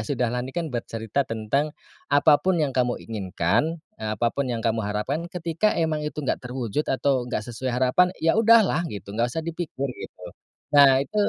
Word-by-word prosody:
Sudahlah 125 Hz, +1 st, -1 dB
ini 125 Hz, -, -5 dB
kan 165 Hz, -5 st, -2 dB
bercerita 115 Hz, +2 st, -2 dB
tentang 115 Hz, +7 st, -1 dB, 0.3 s
apapun 150 Hz, +5 st, +4 dB
yang 150 Hz, -4 st, 0 dB
kamu 125 Hz, -1 st, +1 dB
inginkan, 110 Hz, -, -1 dB, 0.2 s
eee, 110 Hz, 0 st, -3 dB
apapun 120 Hz, +5 st, 0 dB
yang 115 Hz, -1 st, -3 dB
kamu 115 Hz, 0 st, +1 dB
harapkan, 105 Hz, +8 st, -2 dB
ketika 175 Hz, +4 st, 0 dB
emang 160 Hz, -2 st, 0 dB
itu 150 Hz, -1 st, -6 dB
enggak -, -, -1 dB
terwujud 125 Hz, +2 st, -3 dB
atau 130 Hz, -2 st, +1 dB
enggak 105 Hz, -4 st, -2 dB
sesuai 120 Hz, +2 st, -5 dB
harapan, 130 Hz, +8 st, +3 dB
ya 165 Hz, -, +2 dB
udahlah 225 Hz, -6 st, +5 dB
gitu, 100 Hz, -3 st, -8 dB
enggak 115 Hz, +3 st, 0 dB
usah 160 Hz, +6 st, -4 dB
dipikir 155 Hz, -5 st, -4 dB
gitu. 90 Hz, -, -11 dB, 0.5 s
Nah 140 Hz, -2 st, +7 dB
itu 140 Hz, +10 st, -4 dB
130 Hz, 170 wpm, -24 LUFS, 115-155 Hz, 0.5 s, Nah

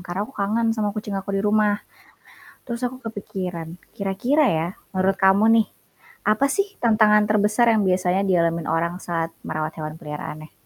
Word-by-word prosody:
karena 180 Hz, +3 st, -3 dB
aku 270 Hz, -, -14 dB
kangen 225 Hz, +3 st, +1 dB
sama 215 Hz, -2 st, -1 dB
kucing 210 Hz, -1 st, -4 dB
aku 195 Hz, 0 st, -3 dB
di 195 Hz, -, -1 dB
rumah. 210 Hz, 0 st, +3 dB, 0.9 s
Terus 235 Hz, -1 st, -5 dB
aku 250 Hz, +1 st, -2 dB
kepikiran 180 Hz, -6 st, -5 dB, 0.2 s
kira-kira, 235 Hz, +10 st, +1 dB
ya, 160 Hz, -1 st, 0 dB, 0.2 s
menurut 190 Hz, 0 st, +1 dB
kamu 195 Hz, +3 st, +5 dB, 0.2 s
nih, 215 Hz, -, -5 dB, 0.6 s
apa 215 Hz, +6 st, +3 dB
sih 395 Hz, +7 st, +1 dB, 0.2 s
tantangan 215 Hz, -2 st, +4 dB
terbesar 215 Hz, +3 st, +3 dB
yang 215 Hz, -3 st, +3 dB
biasanya 185 Hz, +1 st, +1 dB
dialami 170 Hz, -3 st, +1 dB
orang 170 Hz, +2 st, -1 dB
saat 165 Hz, -3 st, -3 dB, 0.2 s
merawat 155 Hz, +1 st, -3 dB
hewan 155 Hz, -1 st, -5 dB
peliharaannya? 155 Hz, 0 st, -7 dB
195 Hz, 160 wpm, -23 LUFS, 175-215 Hz, 0.9 s, kamu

